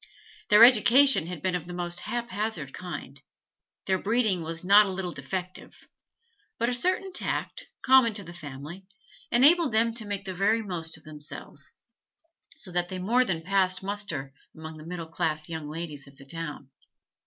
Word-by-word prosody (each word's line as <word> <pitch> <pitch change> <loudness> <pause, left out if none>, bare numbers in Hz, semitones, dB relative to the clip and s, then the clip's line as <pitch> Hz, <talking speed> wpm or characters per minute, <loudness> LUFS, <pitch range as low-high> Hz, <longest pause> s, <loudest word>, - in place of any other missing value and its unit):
Their 210 +2 +8
education 245 - +7
had 175 -4 -7
been 185 - 0
of 175 -2 -3
the 175 - -7
most 175 -1 -4
haphazard 215 - -4
kind; 145 -6 -8 0.6
their 190 -1 +1
breeding 215 -4 +1
was 165 +1 -4
not 200 +3 +6
a - - -3
little 185 -1 -4
defective; 180 +6 -6 0.8
but 235 - 0
a - - -1
certain 370 +8 -1
tact, - - -3 0.2
common 260 -4 +5
to 205 - 0
the 170 -1 -10
family, 155 +4 -9 0.4
enabled 290 +3 +5
them 225 +1 +3
to 225 -2 -3
make 200 -1 -4
the 190 - -4
very 215 +5 +1
most 165 -5 -5
of 160 - -19
themselves, 150 -1 -8 0.8
so 185 - -8
that 175 0 0
they 185 - -5
more 230 +8 +2
than 170 -9 -3
passed 185 0 +1
muster 190 -10 -3 0.2
among 160 0 -9
the 155 +1 -11
middle 175 -1 -5
class 155 -1 -2
young 160 -3 -6
ladies 155 -3 -7
of 135 0 -17
the 140 - -14
town. 150 -3 -7
185 Hz, 170 wpm, -27 LUFS, 160-215 Hz, 0.8 s, Their